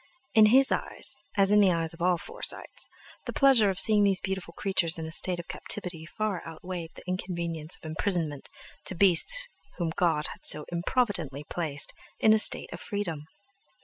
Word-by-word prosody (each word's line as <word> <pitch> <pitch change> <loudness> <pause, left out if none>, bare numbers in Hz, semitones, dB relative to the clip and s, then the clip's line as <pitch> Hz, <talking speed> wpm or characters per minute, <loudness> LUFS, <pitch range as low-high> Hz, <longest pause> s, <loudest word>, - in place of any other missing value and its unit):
In 220 -2 +6
his 265 +5 +4
eyes, - - -2 0.2
as 195 0 +3
in 210 - +5
the 195 -3 +4
eyes 165 -1 -1
of 165 - -14
all 180 0 +2
Forsytes, - - 0 0.4
the - - -4
pleasure 265 -7 +4
of 190 0 -2
seeing 215 -2 +7
these 195 -2 +3
beautiful 190 -3 -5
creatures 190 -4 +1
in 160 - -5
a 160 - -7
state 180 +2 +2
of 170 - -8
captivity 175 -5 -3
far 210 -1 -3
outweighed 170 +1 -7
the - - -12
inconvenience 170 -3 -3
of - - -18
imprisonment 155 -3 -3 0.4
to 190 - -2
beasts 200 - +3 0.3
whom 170 -3 -2
God 165 -4 0
had - - -21
so 150 - +2
improvidently 170 - -2
placed 150 -3 -4 0.3
in 215 - +5
a 220 - +4
state - - +4
of - - -8
freedom! 175 -8 -5
180 Hz, 180 wpm, -27 LUFS, 165-205 Hz, 0.4 s, seeing